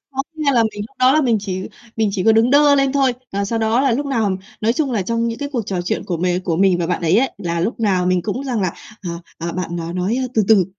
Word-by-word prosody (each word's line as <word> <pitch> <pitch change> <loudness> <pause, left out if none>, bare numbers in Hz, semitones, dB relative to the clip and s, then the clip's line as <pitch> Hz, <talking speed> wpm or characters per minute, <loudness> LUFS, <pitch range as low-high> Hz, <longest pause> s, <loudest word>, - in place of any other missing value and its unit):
khó 270 - -1
nghe 300 -3 +1
là 235 -2 +4
mình 215 -2 -2
lúc - - -30
đó 255 +1 +5
là 310 - +4
mình 245 -6 +2
chỉ 190 -2 -4 0.4
mình 220 -2 +1
chỉ 190 - -1
có 225 - +6
đứng 225 +2 +3
đơ 285 +1 +6
lên 275 -1 +2
thôi. 270 -3 +3 0.2
À, 200 +1 -1
sau 225 +3 -2
đó 225 +3 +2
là 270 -3 +2
lúc 280 +5 -1
nào 220 -8 0 0.2
nói 220 +2 +2
chung 285 0 -1
là, 210 -5 0
trong 230 +3 -1
những 230 - -4
cái 285 - -3
cuộc 235 -5 -2
trò 185 -2 -2
chuyện 175 - -2
của 175 - -2
mì 180 +1 0
của 180 -3 -2
mình 190 -1 +3
và 170 - -1
bạn 175 0 -2
ấy 170 +6 +3
ấy, 265 +1 +1
là 170 -4 -2
lúc 220 +6 -2
nào 185 -4 +1
mình 185 -1 +2
cũng 230 +8 -3
rằng 250 -5 -1
là, 185 -3 0 0.3
à, 175 - -4 0.3
à, 170 +1 -4
bạn 185 -1 -4
nó 170 0 -4
nói 185 +7 -1 0.2
từ 220 - +3
từ, 210 -4 +6
220 Hz, 295 wpm, -19 LUFS, 185-255 Hz, 0.4 s, có